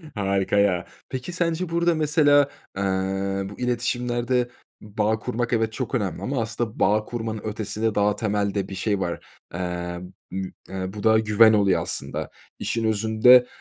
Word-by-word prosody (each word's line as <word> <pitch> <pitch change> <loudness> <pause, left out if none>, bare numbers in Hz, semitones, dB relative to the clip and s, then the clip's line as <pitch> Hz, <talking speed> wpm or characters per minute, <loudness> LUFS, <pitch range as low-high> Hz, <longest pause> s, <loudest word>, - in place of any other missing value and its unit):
Harika 100 -1 0
ya, 95 -3 +2 0.2
peki, 130 +6 -5
sence 170 0 -1
burada, 170 0 +2
mesela, 145 -2 +4 0.3
ııı, 95 0 -1
bu 100 - -11
iletişimlerde 125 0 0 0.3
bağ 105 +1 -1
kurmak, 120 +1 -2
evet, 110 -1 +1
çok 130 - -3
önemli 95 -7 -2
ama 130 +5 -1
aslında 115 0 -3
bağ 105 +2 +3
kurmanın 110 -2 -4
ötesinde 110 0 -2
daha 105 0 +2
temelde 100 -2 -1
bir 95 - -6
şey 100 +1 0
var: 85 -2 -2 0.3
Eee, 90 0 -3 0.3
mü 95 0 -4 0.2
eee, 95 0 -4
bu 105 - -7
da 110 -1 +5
güven 110 +1 +5
oluyor 100 -3 +3
aslında. - - -3 0.3
İşin 115 - -1
özünde, 110 +4 +5
110 Hz, 150 wpm, -24 LUFS, 100-120 Hz, 0.3 s, da